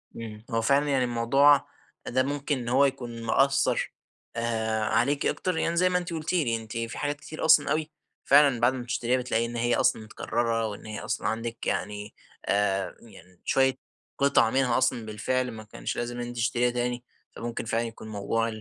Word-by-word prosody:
امم، 110 -1 -8
هو 115 0 +1
فعلًا 140 +5 +3
يعني 135 -2 +2
الموضوع 125 +4 +4 0.4
ده 130 +2 +2
ممكن 145 +1 -1
إن 120 -2 -4
هو 135 +3 +5
يكون 120 -4 -3
مأثّر 140 +4 +2 0.4
آآ، 110 -1 -1
عليكِ 140 +6 +1
أكتر، 185 -3 -1
يعني 170 +1 0
زي 185 +2 +4
ما 180 - +2
أنتِ 175 -1 -4
قلتِ 160 +1 -3
لي، 145 -10 +2
أنتِ 115 0 -6
في 115 0 -4
حاجات 145 0 -1
كتير 155 - -5
أصلًا 155 -3 +5
أوي 155 0 -1 0.3
فعلًا 140 -3 +5
بعد 120 +2 +3
ما 130 - -4
بتشتريها 120 +1 0
بتلاقي 120 -2 0
إن 120 0 -6
هي 120 +1 +1
أصلًا - - +2
متكررة 115 +1 -1
وإن 105 -1 -8
هي 110 -1 -5
أصلًا - - -2
عندِك، 115 +1 -3
يعني 105 0 -3 0.3
آآ، 100 -1 0
يعني 90 -5 -17
شوية 130 -1 +3 0.4
قطع 140 -5 +4
منها 125 -1 +2
أصلًا 130 -3 +1
بالفعل 125 +4 -1
ما 110 -1 -9
كانش 105 - -5
لازم 120 0 -3
أنتِ 120 0 -5
تشتريها 120 +1 +1
تاني، 120 0 -2 0.3
فممكن 115 0 -4
فعلًا 115 +1 0
يكون 115 -1 -8
موضوع 110 +2 -1
120 Hz, 185 wpm, -27 LUFS, 115-140 Hz, 0.4 s, هو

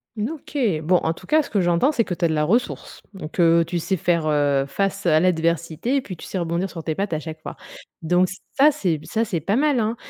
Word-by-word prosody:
N 215 +4 -2
OK. 295 -1 -8 0.2
Bon, 175 +4 +2
en 165 - -1
tout - - -15
cas, 310 0 +3
ce - - -10
que 200 -3 +1
j'entends 175 - +2
c'est 235 -6 +1
que 180 - -4
tu 170 - 0
as - - +4
de 160 - -1
la 150 0 +1
ressource, 230 +10 -1
donc 180 -2 -8
heu, 165 0 +5
tu 175 +1 -3
sais 190 +3 -1
faire, 170 -1 0
heu, 145 -2 +2
face 195 +5 -2
à 155 -2 +4
l'adversité 170 - 0
et 275 - +2
puis 185 -8 -8
tu - - -10
sais 185 - -4
rebondir 170 +3 -1
sur 165 -3 -7
tes 160 -2 -2
pattes 195 -4 -2
à 155 - 0
chaque 155 0 -8
fois. - - -7 0.5
Donc 180 +3 +2 0.3
ça, 290 +3 +5
c'est 185 - -1
b 150 - -14
ça, 225 +1 -1
c'est 175 -5 -2
pas 200 +7 0
mal, 285 -2 +2
hein? 220 +2 0
175 Hz, 265 wpm, -22 LUFS, 160-210 Hz, 0.5 s, heu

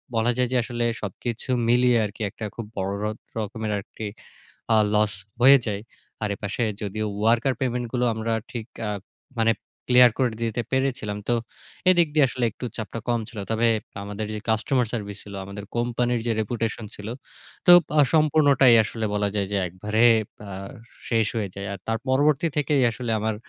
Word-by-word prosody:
বলা 115 +2 +3
যায় 125 -1 +1
যে, - - +3
আসলে 120 0 -2 0.2
সবকিছু 115 +5 -4 0.2
মিলিয়ে 125 0 +4
আরকি 105 +2 -8
একটা 110 - -7
খুব 115 - -5
বড় 95 0 -1
র - - 0 0.3
রকমের 110 0 -3
আরকি 105 +2 -7 0.7
আ - - +6 0.2
loss 105 0 +3 0.3
হয়ে 135 +3 +8
যায়। 100 0 -3 0.4
আর 105 - 0
এপাশে 100 +4 -3 0.2
যদিও 105 +1 -2 0.2
worker 120 +3 +3
payment 125 -2 -1
গুলো 125 -1 +1
আমরা 110 +1 -2 0.2
ঠিক 120 -4 -5 0.2
আ - - -1 0.5
মানে 115 0 +4 0.4
clear 125 -1 +7
করে 125 -4 +1
দিতে 115 +1 -1
পেরেছিলাম। 130 -6 -1
তো 120 - +3 0.6
এদিক 175 -3 +4
দিয়ে 150 -3 +5
আসলে 125 0 -2
একটু 110 - -9
চাপটা 110 +1 -5
কম 120 -1 +2
ছিল। 115 - -9
তবে 115 +1 +3 0.3
আমাদের 105 +1 -5
যে, - - -3
customer 125 +4 +2
service 100 -3 -4
ছিল, 100 - -10
আমাদের 100 +1 -8
কোম্পানির 120 0 0
যে, 115 - +2
reputation 115 +1 -2
ছিল 105 +1 -8 0.6
তো 175 - +9 0.3
আ - - +8
সম্পূর্ণটাই 145 -5 +5
আসলে 110 +1 -4
বলা 105 0 +1
যায় 100 -2 0
যে, 100 - +1
একবারে 105 +6 0 0.4
আ - - -7 0.6
শেষ 115 -2 +2
হয়ে 105 -3 -1
যায়। 100 0 -5
আর 100 - -5
তার 115 0 0
পরবর্তী 145 +4 +3
থেকেই 145 -1 +2
আসলে 120 +1 -5
আমার 110 +1 0
115 Hz, 175 wpm, -24 LUFS, 105-125 Hz, 0.7 s, তো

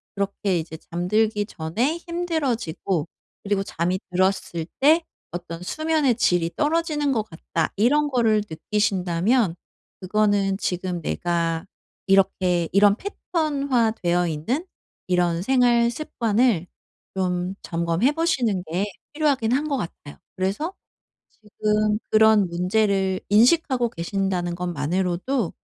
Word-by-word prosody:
그렇게 200 -2 -1
이제 160 0 -7
잠들기 205 +6 0
전에 220 - -1
힘들어지고 255 - -1 0.4
그리고 200 -1 0
잠이 180 0 -1
들었을 180 -3 0
때 315 +5 +5 0.3
어떤 175 0 -6
수면의 310 - +1
질이 175 -7 +1
떨어지는 300 -1 +1
것 220 -3 0
같다. 165 0 -3
이런 290 +7 +3
거를 225 -5 +2
느끼신다면 190 +2 +1 0.5
그거는 200 0 +1
지금 180 -1 -2
내가 165 +1 -1 0.4
이렇게 185 -3 +2
이런 200 +1 +5
패턴화 280 - 0
되어 175 -1 +2
있는 225 - -2 0.4
이런 175 -2 +1
생활 240 -1 +3
습관을 230 - 0 0.5
좀 180 0 -1
점검해 170 +8 +1
보시는 255 - 0
게 185 +4 0 0.3
필요하긴 280 -7 +1
한 290 +4 +1
것 280 - 0
같아요. 155 - -7 0.2
그래서 200 - -1 0.6
지금 210 0 -1
그런 215 -2 +5
문제를 190 +1 +1
인식하고 245 +3 +4
계신다는 180 -1 -2
것만으로도 180 - -1
200 Hz, 265 characters per minute, -23 LUFS, 175-250 Hz, 0.6 s, 때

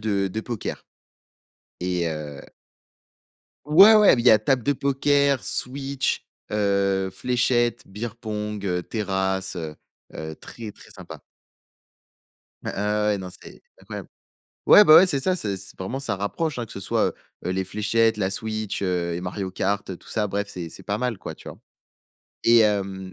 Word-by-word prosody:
de 100 -2 0
de 110 +4 -4
poker. 115 -2 -5 1.0
Et 90 -1 0
heu 75 -3 -6 1.2
Ouais, 190 +9 +8
ouais! 210 -6 +7
Il 120 - -1
y 120 - +6
a 110 - +7
table 125 +4 +1
de 145 - +2
poker, 140 0 +2
Switch, 135 +1 -2 0.3
heu, 100 -2 +1
fléchettes, 120 +2 0
bière-pong, 105 -1 -5
heu, 90 -2 -1
terrasse, 95 -2 -2
heu, 80 -3 -5 0.4
heu, 80 0 -6
très 110 -3 -9
très - - -17
sympa! - - -11 1.4
Ah - - -3
ah 105 +1 0
ouais, 105 -1 +1
non, 95 -1 -6
c'est, - - -14 0.2
incroyable! - - -8 0.6
Ouais, 210 - +9
ben, 155 - +8
ouais, 185 +3 +8
c'est 140 -6 0
ça, 185 +5 +1
c'est 100 - -2
c 100 +1 -10
vraiment, 115 +9 -4
ça 130 -7 -2
rapproche, 145 - -2
hein, 120 - -2
que 110 - -13
ce - - -7
soit, 95 - 0 0.3
heu, - - -1
les 95 +1 -1
fléchettes, 110 +3 +1
la 95 -2 0
Switch, 110 +1 -4
heu, 90 -2 -1
et 85 - -3
Mario 95 +1 -4
kart, 100 +2 -1
tout - - -19
ça. 110 -2 -1
Bref, 100 +1 -3
c'est 85 -5 -7
c'est - - -12
pas 100 - -2
mal 125 -2 -2
quoi, - - -7
tu - - -12
vois? - - -10 0.8
Et 115 0 +6
hem 95 -3 0
105 Hz, 170 wpm, -24 LUFS, 95-120 Hz, 1.4 s, Ouais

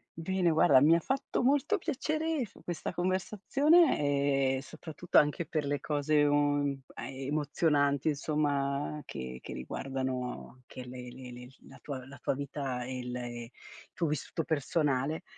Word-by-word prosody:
bene 175 +1 +1
guarda 155 -4 +6
mi 160 +3 +6
ha - - +3
fatto 265 - -1
molto 290 +10 +3
piacere 310 -2 -1
f - - -18
questa 175 -3 -4
conversazione, 180 - +3
e - - -4
soprattutto 160 +3 -3
anche 150 +3 +4
per 155 -2 -2
le 145 0 -1
cose, 150 +1 +1
ehm, 145 -1 +2
emozionanti 145 +1 0
insomma 145 0 -1
che 65 0 -6
che - - -7
riguardano 130 - -4
che 125 - -9
le 125 0 -8
le 125 -1 -10 0.2
la - - -14
tua 130 -3 -6
la 140 0 -11
tua - - 0
vita, 135 -3 -3
e 130 +1 -5
il 125 0 -5
il 120 -1 -6 0.4
tuo 170 - 0
vissuto 150 +2 -2
personale, 145 -1 0
145 Hz, 140 wpm, -31 LUFS, 130-165 Hz, 0.4 s, guarda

